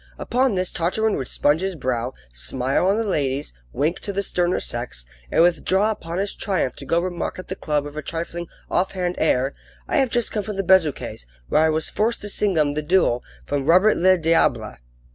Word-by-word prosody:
Upon 255 -2 +1
this 185 0 0
Tartarin 210 +6 0
would 130 - -4
sponge 145 +3 +2
his 190 -1 -2
brow, 125 -3 -2 0.2
smile 130 - 0
on 200 +2 +3
the 225 - 0
ladies, 140 - -1 0.2
wink 155 +6 0
to 205 - -4
the 200 0 -1
sterner 175 -1 +1
sex, 120 - -4 0.3
and - - +5
withdraw 190 +4 +2
upon 170 -5 -5
his 200 +1 -1
triumph 185 - -1
to - - -9
go 165 - +3
remark 175 0 -3
at 185 - -9
the 190 - -3
club 150 -5 -1
with 145 0 -8
a 155 - -3
trifling, 170 +2 -4 0.2
offhand 180 -1 0
air: 135 -3 +2 0.3
"I - - 0
have 270 -3 +3
just 240 -1 -1
come 210 - -1
from 205 +1 -5
the 195 - -1
Bezuquets', 165 - +2 0.2
where - - +4
I 160 - +4
was 155 0 0
forced 225 +3 0
to 205 - -4
sing 200 -3 0
'em 145 -2 +2
the 150 - -1
duo 150 -7 +2 0.2
from 140 -2 -2
Robert 185 +7 +5
le 185 +1 +4
Diable." 165 0 +1
175 Hz, 205 wpm, -23 LUFS, 145-195 Hz, 0.3 s, and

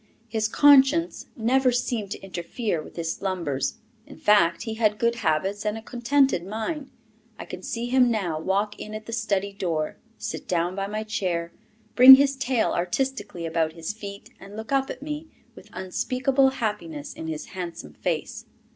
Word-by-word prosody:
His 220 -1 0
conscience 290 +6 +4
never 255 +2 +2
seemed 240 -4 -1
to - - -6
interfere 185 0 -3
with - - -13
his 165 -1 -2
slumbers. 170 -9 -2 0.3
In - - -12
fact, 170 -5 +3
he 225 - -4
had 215 -2 +1
good 235 +1 +1
habits 195 +2 0
and 210 +1 -1
a - - -7
contented 250 -3 +1
mind. 225 - -4 0.5
I - - -7
can 180 - -8
see 230 +4 -4
him 250 0 +4
now 185 -9 -1
walk 200 +5 -1
in 215 0 -7
at 215 0 -7
the 230 - -7
study 200 -4 -1
door, 165 -6 -2 0.2
sit - - -6
down 175 -2 0
by 195 0 -2
my 215 +1 -3
chair, 180 -6 -2 0.4
bring 260 +2 +12
his 275 0 +2
tail 260 -3 0
artistically 205 -1 -2
about 160 -1 0
his 165 +4 -5
feet, 200 -2 -9
and 200 +1 -12
look 220 +3 -7
up 270 -1 +1
at - - -7
me 300 +1 -5 0.3
with - - -15
unspeakable 255 +8 +1
happiness 205 - -4
in 160 - -7
his 155 -1 -4
handsome 170 - -6
face. - - -3
210 Hz, 175 wpm, -25 LUFS, 175-245 Hz, 0.5 s, bring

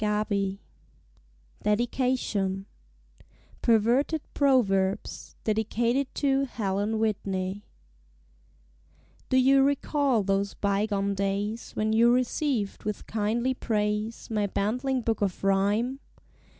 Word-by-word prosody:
PERVERTED 210 -2 0 1.0
PROVERBS 210 -4 0 1.0
Perverted 240 +8 +2
Proverbs 205 -8 +1
Dedicated 230 +5 0
to 275 -1 +2
Helen 210 -2 -2
Whitney 200 -2 -2 1.6
Do 260 - +3
you 270 +1 +5
recall 280 -3 +1
those 195 +1 0
bygone 200 0 0
days, 200 +3 -2
When 215 0 0
you 235 +2 +5
received 250 -3 0
with 210 -1 -4
kindly 225 +4 0
praise 210 -2 -2
My 210 -2 +1
bantling 250 +7 -1
book 225 -2 -1
of 195 -2 -1
Rhyme? 205 +7 +1
215 Hz, 90 wpm, -27 LUFS, 200-250 Hz, 1.6 s, you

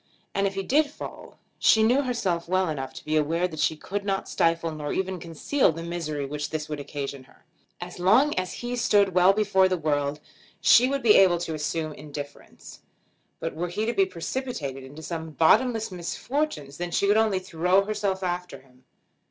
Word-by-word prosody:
And 200 0 +1
if 195 - -5
he 195 - -2
did 290 +8 +2
fall, 295 - -10 0.2
she 220 - +5
knew 245 +5 +4
herself 190 -10 -2
well 185 -1 +2
enough 135 -4 -4
to - - -10
be 155 - -1
aware 165 +4 +1
that 160 -3 -9
she 150 +1 +2
could 200 +6 -4
not 195 -1 -2
stifle, 165 0 +1
nor 150 -1 -5
even 190 -1 -2
conceal, 170 - +1
the 165 +1 -7
misery 160 -4 -3
which 150 +1 -4
this 155 -1 -4
would 150 -1 -5
occasion 140 -2 -6
her. - - -24 0.3
As 180 0 -8
long 225 +12 +4
as 185 0 -2
he 245 +1 -2
stood 205 -5 +3
well 180 +1 +6
before 195 -2 +3
the 185 - 0
world 145 -2 -1 0.4
she 250 +3 +6
would 275 0 -2
be 225 - +6
well - - +8
able 180 -2 +4
to 165 -2 -3
assume 155 +1 -3
indifference. 145 -1 -10 0.6
But - - -4
were 175 +3 -3
he 210 +5 -2
to 235 - 0
be 195 -3 +3
precipitated 170 - -4
into 145 +4 -11
some 160 0 -5
bottomless 225 - +3
misfortunes 180 - -3
then 175 0 -3
she 185 - +1
could 205 +1 +4
only 220 -3 +3
throw 185 +1 +1
herself 200 -2 -2
after 180 0 -3
him. 130 -1 -25
175 Hz, 195 wpm, -26 LUFS, 155-200 Hz, 0.6 s, well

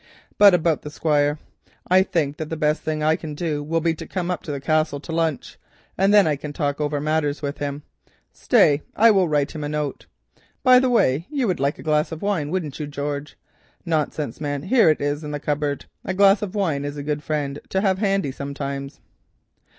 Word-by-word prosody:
But 200 -3 +8
about 165 -2 +1
the 150 - -7
Squire. 150 -1 +1 0.5
I 185 +1 +5
think 150 -6 -1
that 155 -1 -5
the 160 - -4
best 150 0 +1
thing 155 -1 -2
I 155 +1 +3
can 155 -2 -7
do 150 -2 -2
will 165 +3 -1
be 165 0 +1
to 160 - -9
come 180 -1 -3
up 180 - -3
to 150 - -6
the 140 - -3
Castle 155 0 0
to 150 - -9
lunch, 160 -3 -2 0.4
and 195 +2 +3
then 205 -2 +6
I 155 -2 +1
can 145 +1 -7
talk 145 0 -2
over 145 -1 -1
matters 150 0 -1
with 140 0 -4
him. 145 0 -4 0.5
Stay, 145 0 +3
I 230 +1 +6
will 190 -4 +3
just - - -6
write 145 -1 +1
him 155 -2 -6
a 145 - -3
note. 150 -2 -4 0.6
By 255 -1 +7
the 260 0 +1
way, 165 - +2
you 280 -4 -1
would 185 -5 -1
like 140 +1 0
a - - -11
glass 155 0 +1
of 160 +2 -7
wine, 185 -8 -1
wouldn't 160 -5 -3
you, 150 - -4
George? 145 0 -5 0.5
Nonsense 155 -5 -2
man, 145 -1 -3
here 225 0 +4
it 155 - +1
is 145 +2 -1
in 150 - -5
the 145 0 -4
cupboard, 145 -1 -2 0.2
a 190 - -3
glass 195 +1 +5
of 210 -1 -5
wine 160 -9 0
is 145 0 -5
a 145 - -5
good 150 0 -2
friend 145 -2 -3
to 190 - 0
have 190 -2 +1
handy 195 -8 0
sometimes." 140 0 -6
150 Hz, 220 wpm, -22 LUFS, 145-175 Hz, 0.6 s, But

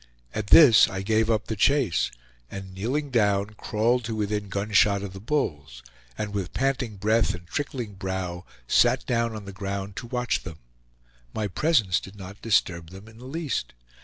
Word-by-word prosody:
At 105 -2 -3
this 125 -3 +8
I 95 0 -4
gave 110 +2 +2
up 110 -2 +1
the 110 - -3
chase, 125 - +2 0.4
and 95 -1 -8
kneeling 130 +9 -2
down, 100 -3 +2
crawled 115 +3 0
to 115 -1 -3
within 105 -1 -2
gunshot 100 0 +2
of 100 -2 -6
the 95 - -8
bulls, 75 - -3 0.3
and 105 -1 -4
with 95 -3 -4
panting 135 -5 0
breath 110 +1 +2
and 85 0 -12
trickling 125 - -4
brow 95 -2 -4 0.2
sat - - +3
down 115 -2 0
on 105 -2 -7
the 100 - -8
ground 100 0 -5
to 120 - -6
watch 125 0 -1
them; 80 -3 -9 0.8
my 110 -1 -1
presence 100 - +2
did 95 - -12
not 100 +1 -10
disturb 85 -7 +1
them 95 +4 -12
in 110 +1 -15
the 125 - -11
least. 145 - -3
105 Hz, 175 wpm, -26 LUFS, 95-115 Hz, 0.8 s, this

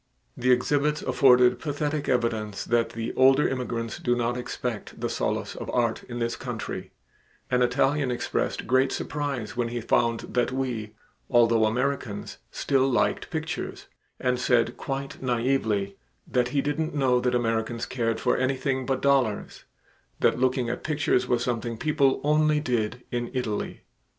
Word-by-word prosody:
The 125 +1 -1
exhibits 145 +4 +2
afforded 125 -1 +5
pathetic 145 0 -2
evidence 110 -4 0
that 120 -1 +2
the 115 0 -4
older 135 +2 +5
immigrants 120 -4 -3
do 120 - +1
not 120 0 0
expect 125 -2 -5
the - - -2
solace - - -2
of - - -6
art 115 -2 0
in 120 - -7
this 115 0 -1
country; - - -5 0.6
an 125 0 +3
Italian 135 +3 +2
expressed 120 -1 -2
great 130 +2 +3
surprise 135 -7 -3
when 120 -1 0
he 120 +1 -3
found 115 0 +1
that 125 0 -1
we, 120 -5 -3 0.3
although 115 -2 +4
Americans, 125 -2 -2
still 135 -1 +1
liked 125 - +1
pictures, 160 -1 -4 0.3
and 125 -1 0
said 120 -1 +2
quite 135 0 -5
naively 115 -6 0 0.3
that 125 -1 +1
he 135 +2 0
didn't 155 +2 -2
know 130 -3 +3
that 125 0 +1
Americans 115 0 -1
cared 115 -3 -1
for - - +2
anything 130 0 0
but 135 -1 -1
dollars 135 -7 +1 0.5
that - - +2
looking 130 -1 +1
at 120 - -4
pictures 145 -4 +1
was 120 -1 +1
something 120 -1 -2
people 140 -1 +2
only 150 0 +3
did 125 -3 -1
in 120 -1 -2
Italy. 110 -5 -3
125 Hz, 150 wpm, -26 LUFS, 115-135 Hz, 0.6 s, afforded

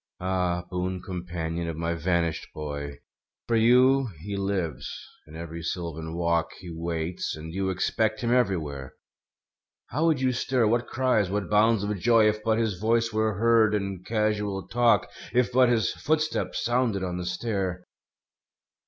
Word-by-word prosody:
Ah, 90 -1 0
boon 90 +1 -2
companion 85 -2 -4
of 80 -2 -4
my 85 +1 -1
vanished 85 0 0
boy. 75 -1 -5 0.5
For 115 - +1
you 125 +4 +5
he 100 +3 -4
lives; 90 -8 -2 0.4
in 75 - -12
every 85 0 -6
sylvan 80 -1 -4
walk 85 -1 0
He 90 -3 -9
waits; 85 +1 -3
and 80 +1 -8
you 95 +1 -1
expect 110 +4 0
him 120 -1 0
everywhere. 80 - -1 1.0
How 155 +5 +1
would 155 -5 +3
you 130 -1 +2
stir, 125 -1 +1
what 120 +2 +1
cries, 125 -7 +1
what 100 -1 -2
bounds 110 0 +4
of 105 0 -1
joy. 115 0 +5
If 105 0 0
but 110 -1 +2
his 110 -6 -1
voice 115 +1 +1
were 110 -1 +1
heard 110 0 +4
in 100 -3 -3
casual 105 -3 -1
talk. 120 -2 +3 0.3
If 125 0 +2
but 125 0 +5
his 115 -3 +2
footstep 155 +1 -1
sounded 120 -5 0
on 90 -1 -3
the 90 - -4
stair! 95 -2 -2
100 Hz, 155 wpm, -26 LUFS, 85-115 Hz, 1.0 s, you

